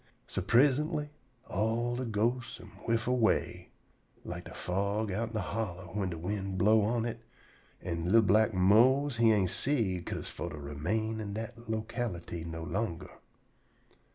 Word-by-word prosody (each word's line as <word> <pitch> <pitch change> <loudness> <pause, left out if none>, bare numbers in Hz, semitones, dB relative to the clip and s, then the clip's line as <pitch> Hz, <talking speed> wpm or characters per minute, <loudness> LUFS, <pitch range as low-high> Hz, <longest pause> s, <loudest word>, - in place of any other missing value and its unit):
So 95 - -3
prisintly 145 - +3 0.4
all 115 +4 0
de 130 +1 -2
ghostes 120 +2 -1
am - - -12 0.2
whiff 115 0 +1
away, 125 -3 +1 0.6
like - - -6
de - - -9
fog 100 +3 -1
outen 115 +3 -2
de 110 - 0
holler 95 -2 -3
whin 100 -2 -1
de 85 - -5
wind 95 +2 -3
blow' 105 +4 +5
on 115 +2 +1
it, 115 -1 -4 0.6
an' 85 +1 -2
li'l 115 +1 +7
black 110 +3 +4
Mose 120 +8 +4
he 115 -1 +5
ain' 100 -4 +3
see 105 -4 0
'ca'se - - -5
for - - -5
to 75 - -8
remain 90 +11 -2
in 100 -2 -4
dat 115 +1 -7
locality 110 -7 -3
no 80 0 -6
longer. 90 -1 -3
110 Hz, 155 wpm, -31 LUFS, 95-115 Hz, 0.6 s, li'l